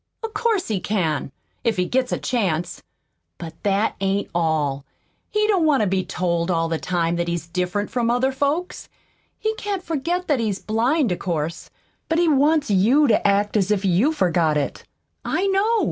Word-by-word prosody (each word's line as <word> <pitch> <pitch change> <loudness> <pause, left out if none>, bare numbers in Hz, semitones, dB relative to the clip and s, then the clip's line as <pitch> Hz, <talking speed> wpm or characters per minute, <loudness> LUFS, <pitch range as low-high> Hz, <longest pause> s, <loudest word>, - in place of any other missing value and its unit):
"Of 450 -1 -4
course 425 -3 0
he 210 -3 0
can 165 -9 -1 0.3
if 230 -4 +1
he 180 - +1
gets 255 +5 0
a - - 0
chance! 180 -9 -1 0.6
But 165 -2 -8
that 205 +2 +1
ain't 195 +1 -1
all. 155 -5 0 0.5
He 425 0 +1
don't 400 -5 +2
want 285 -5 +3
to 210 - +2
be 190 0 0
told 170 -1 -1
all 165 -2 +1
the 165 -1 -2
time 170 -1 -1
that 170 0 -1
he's 170 -1 -2
different 180 +4 -2
from 240 -2 0
other 245 +3 +2
folks. 290 +7 -2 0.5
He 435 0 -1
can't 400 -3 -3
forget 340 +3 -2
that 290 -5 +2
he's 215 -4 -1
blind, 235 - +1
of 180 - -2
course, 165 -2 -3 0.4
but 325 - +1
he 345 0 +3
wants 295 -2 +3
you 235 +10 +4
to 210 - +3
act 200 +1 +1
as 200 -2 +2
if 205 -1 +1
you 195 - +3
forgot 170 - +1
it. 145 - -3 0.4
I 380 - 0
know. 400 +4 +2
210 Hz, 185 wpm, -22 LUFS, -, 0.6 s, you